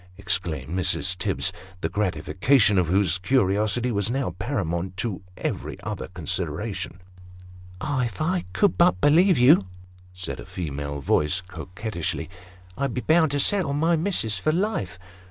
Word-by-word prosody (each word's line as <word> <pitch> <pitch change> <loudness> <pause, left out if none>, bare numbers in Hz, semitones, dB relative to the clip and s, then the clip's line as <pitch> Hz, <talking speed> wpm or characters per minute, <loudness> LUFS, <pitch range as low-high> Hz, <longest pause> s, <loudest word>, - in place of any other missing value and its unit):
" - - -25
exclaimed 85 -5 -1
Mrs. 95 0 +1
Tibbs, 95 0 0 0.3
the - - 0
gratification 100 +3 +2
of 90 - +1
whose 95 0 +2
curiosity 110 +2 +1
was 100 -1 0
now 130 -5 -1
paramount 90 - -3
to 100 -3 -3 0.2
every - - -4
other 105 -2 -5
consideration. 90 +3 -3 0.4
" 90 0 -18
Ah! 130 0 0
if 115 -5 -6
I 180 +3 0
could 195 - +2
but 175 +1 +4
believe 165 +4 +5
you," 125 - +6 0.4
said 90 0 -6
a - - -8
female 70 -4 -5
voice 75 +6 +1
coquettishly, 95 -1 -5 0.2
" 90 -1 -23
I'd 140 -3 -1
be 125 - -1
bound 160 +1 +4
to 145 +1 -1
settle 180 -2 +2
my 165 +4 +2
missis 155 - 0
for 125 - +1
life." 170 - -1
100 Hz, 155 wpm, -25 LUFS, 90-135 Hz, 0.4 s, you